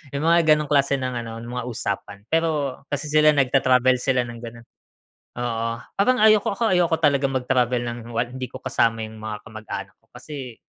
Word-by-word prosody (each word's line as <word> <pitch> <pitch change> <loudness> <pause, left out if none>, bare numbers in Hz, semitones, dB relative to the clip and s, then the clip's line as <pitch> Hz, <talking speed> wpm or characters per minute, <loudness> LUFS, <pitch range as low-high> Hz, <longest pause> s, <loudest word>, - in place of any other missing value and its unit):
Yung 140 - -2
mga 170 +1 +5
gano'ng 150 -1 -4
klase 140 -1 +3
ng 130 -1 -3
ano, 115 0 -7
mga 125 +1 -5
usapan. 100 -3 -5
Pero 155 -5 0
kasi 145 +1 -3
sila 155 0 +6
nagta-travel 130 -2 +3
sila 130 -2 +1
ng 120 -1 -9
gano'n. 115 0 -10 0.7
Oo. 115 -1 -2 0.3
Parang 250 +6 +3
ayoko 215 -2 +5
ako 200 - -3
ayoko 175 -2 +2
talagang 140 -3 +2
mag-travel 125 -1 +1
ng 120 - -5 0.2
wal 120 +1 -1
hindi 130 +1 -5
ko 130 - -10
kasama 115 -3 +1
yung 110 0 -7
mga 110 -1 -4
kamag-anak 110 -1 -7
ko, - - -37
kasi 130 -6 -8
130 Hz, 180 wpm, -23 LUFS, 120-145 Hz, 0.7 s, sila